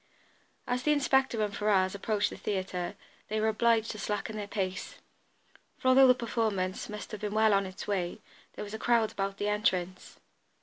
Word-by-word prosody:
As 250 0 -1
the 300 - +2
inspector 265 -5 +2
and 205 -1 -2
Ferrars 195 -3 +2
approached 205 +1 0
the - - -6
theatre 185 -2 -3 0.3
they 215 0 -1
were 220 +1 +2
obliged 225 0 +2
to 215 - -8
slacken 210 +2 -3
their 205 -1 -4
pace, 190 -3 -3 0.8
for, 255 - +1
although 265 +1 +7
the 250 - +6
performance 220 -7 -2
must 210 0 -7
have 215 - -6
been 210 0 -3
well 220 -1 +4
on 195 -1 +2
its 185 - -8
way, 185 -4 -1 0.3
there - - -6
was 205 0 -8
a 220 - -4
crowd 230 -2 +2
about 195 0 -3
the 205 - -2
entrance. 190 -4 -1
210 Hz, 185 wpm, -30 LUFS, 195-225 Hz, 0.8 s, although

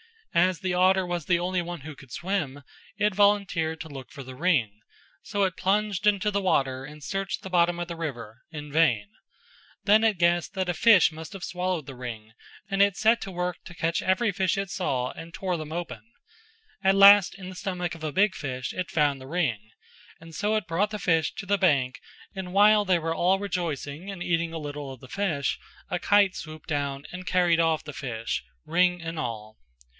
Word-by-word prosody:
As 180 -1 +2
the 185 -1 -1
otter 185 +1 +4
was 175 -3 -3
the 175 - +3
only 180 +1 -1
one 175 -2 -6
who 155 +2 -8
could 135 -2 -16
swim 155 -5 -3 0.3
it 210 -1 +2
volunteered 190 -6 +2
to 160 - -7
look 135 -3 -9
for 140 - -9
the 130 0 -9
ring, 130 - +1 0.4
so 205 -2 -1
it 185 -3 0
plunged 205 +1 +1
into 210 0 +3
the 200 0 0
water 135 -8 +1
and 150 +1 -11
searched 195 +2 -3
the 190 - -6
bottom 175 -1 +3
of 175 - -3
the 170 - -5
river 120 -8 -6
in 150 -2 -8
vain; 130 -10 +2 0.7
then 215 +2 +5
it 215 -4 +2
guessed 170 0 +2
that 190 -3 -2
a - - +1
fish 195 0 +6
must 160 +4 -9
have 195 -2 -8
swallowed 180 -3 -2
the 135 - -9
ring 115 -3 -7 0.4
and 195 -1 0
it 200 -1 +4
set 225 +3 +3
to 195 - -5
work 180 -1 -3
to 175 - -10
catch 165 0 0
every 190 +4 +2
fish 190 -1 0
it 195 -2 -3
saw 130 -9 -1
and 165 +1 -10
tore 185 -2 -2
them 155 -1 -7
open; 175 0 -5 0.8
at 190 0 +4
last 200 -1 +8
in 185 -2 -9
the 185 - -9
stomach 180 -1 -3
of 165 -2 -10
a 155 -2 -3
big 200 +1 +3
fish 130 -5 -4
it 180 -1 -3
found 145 -3 +1
the 130 - -10
ring, 150 -9 0 0.7
so 210 +7 0
it 215 -3 -1
brought 170 +6 0
the 215 - -4
fish 165 -5 +1
to 200 - -6
the 200 +1 +1
bank 140 -8 +2 0.3
and 190 -2 -6
while 210 +1 +6
they 185 -2 +3
were 165 0 -2
all 180 +3 +2
rejoicing 175 -3 -4
and 190 -3 -5
eating 170 -1 0
a - - -3
little 145 -2 -6
of 130 - -14
the 130 - -13
fish 170 -8 -1 0.3
a 180 - 0
kite 205 -1 +4
swooped 155 -1 -9
down 140 -2 -2
and 185 0 -8
carried 175 -2 +3
off 165 -1 +2
the 150 - -8
fish, 115 - -4 0.2
ring 180 +1 +2
and 165 -1 -5
all. 110 -4 -5
175 Hz, 210 wpm, -26 LUFS, 150-190 Hz, 0.8 s, last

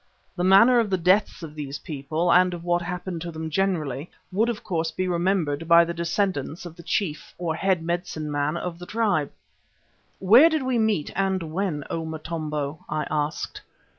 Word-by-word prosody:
The 175 - -2
manner 230 +7 +6
of 225 -3 +1
the 190 - +1
deaths 185 +1 +2
of 155 -2 -7
these 145 -2 -5
people 155 +4 -1
and 180 0 +4
of 170 - -9
what 175 0 +1
happened 175 -1 -5
to 175 - -5
them 160 0 -6
generally 155 -5 -1 0.2
would 220 +5 +1
of 230 -3 -4
course 165 -2 -1
be 185 +3 -2
remembered 170 -4 0
by 170 0 +7
the 170 - -4
descendants 170 -1 -2
of 170 -2 -9
the 170 - -11
chief 165 -3 -3
or 170 -2 -2
head 185 0 0
medicine 165 -3 -3
man 145 +3 0
of 170 -1 -5
the 175 - -9
tribe. 210 -10 0 0.9
"Where 235 - +7
did 315 -4 0
we 255 -2 0
meet, 215 -9 +1
and 190 -1 0
when, 175 -6 -1
O 165 - -2
Motombo?" 155 -2 -4
I 150 -1 -1
asked. 150 0 -2
170 Hz, 185 wpm, -25 LUFS, 155-190 Hz, 0.9 s, by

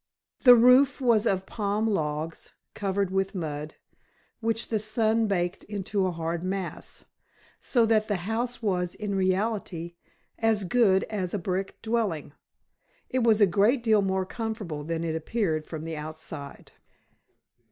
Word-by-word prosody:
The 250 -2 +9
roof 250 +3 +5
was 235 -4 +3
of 190 -1 0
palm 210 +1 -1
logs, 160 -5 -3 0.2
covered 200 -1 -1
with 195 +1 -1
mud, 155 -3 -4 0.6
which 225 0 -1
the 220 - +1
sun 220 +1 +2
baked 175 -3 -1
into 200 -1 -1
a - - -1
hard 165 0 -3
mass, 185 -1 -4 0.5
so 240 -3 +2
that 220 -1 +2
the 205 - 0
house 235 +3 -2
was 180 -4 -1
in 210 -1 -4
reality 190 -3 -1 0.5
as 220 -2 +2
good 195 -1 +3
as 190 -3 -3
a - - +1
brick 190 +1 -3
dwelling. 215 -11 -1 0.8
It 255 - +1
was 225 -2 +4
a - - +9
great 210 +7 +2
deal 220 -3 +4
more 190 -1 0
comfortable 210 -9 -5
than 165 +1 -3
it 160 -1 -2
appeared 160 -2 -1
from 160 -2 -6
the 165 -1 -5
outside. 150 -2 -7
195 Hz, 145 wpm, -27 LUFS, 170-225 Hz, 0.8 s, The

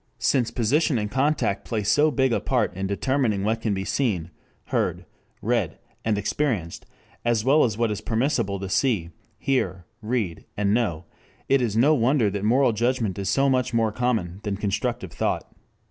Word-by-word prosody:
Since 125 -5 +1
position 135 +4 +1
and 105 -1 -2
contact 135 -7 +1
play 110 -3 -2
so 145 +10 +4
big 130 -3 +1
a - - +2
part 120 -8 0
in 95 +1 -2
determining 110 0 0
what 110 +2 0
can 110 -3 0
be 95 0 -3
seen, 100 - -1 0.4
heard, - - -1 0.4
read, - - 0 0.3
and 110 -2 +1
experienced, 105 - -2 0.4
as 120 -2 +1
well 145 +4 +5
as 110 -3 0
what 115 -2 +1
it - - +1
is 105 - -6
permissible 110 -5 0
to 95 - -3
see, 95 -5 +1 0.3
hear, 95 -10 -1 0.2
read, 110 -7 -2
and 100 0 +2
know, 90 -8 0 0.4
it 135 -1 +3
is 110 -3 0
no 140 +7 +5
wonder 120 -4 +2
that 100 0 -3
moral 120 +3 +3
judgment 115 -4 0
is 95 -1 -2
so 135 +5 +3
much 130 -3 +1
more 115 -1 +2
common 110 -7 -1
than 100 -2 -3
constructive 105 0 -2
thought. - - -2
115 Hz, 175 wpm, -24 LUFS, 100-130 Hz, 0.4 s, well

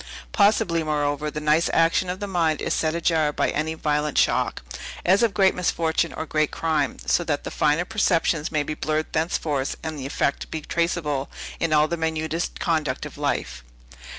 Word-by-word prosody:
Possibly, 200 -5 +3
moreover, 150 -1 -1
the 150 - -5
nice 150 +2 +2
action 165 +2 +3
of 185 +1 -3
the 205 - -3
mind 170 -5 +1
is - - -1
set 155 0 0
ajar 160 -3 +2
by - - 0
any 160 +2 -1
violent 150 -1 -1
shock, - - +2 0.4
as 190 +5 +4
of 230 -4 +2
great 190 -2 +4
misfortune 170 -2 0
or - - -4
great 155 -1 +1
crime, 155 -4 -1
so 175 - +2
that 145 -4 -2
the - - -5
finer 150 +3 +2
perceptions 175 -6 +1
may 150 -2 +1
be 155 - -4
blurred 155 +1 -2
thenceforth, 155 -4 -1
and 160 -2 -4
the 135 - -4
effect 140 - -1
be 160 - -3
traceable 150 -4 -1 0.3
in 165 - 0
all 150 0 +4
the 170 - -2
minutest 160 +1 -2
conduct 155 -6 -1
of - - -9
life. - - -2
160 Hz, 180 wpm, -24 LUFS, 150-170 Hz, 0.4 s, as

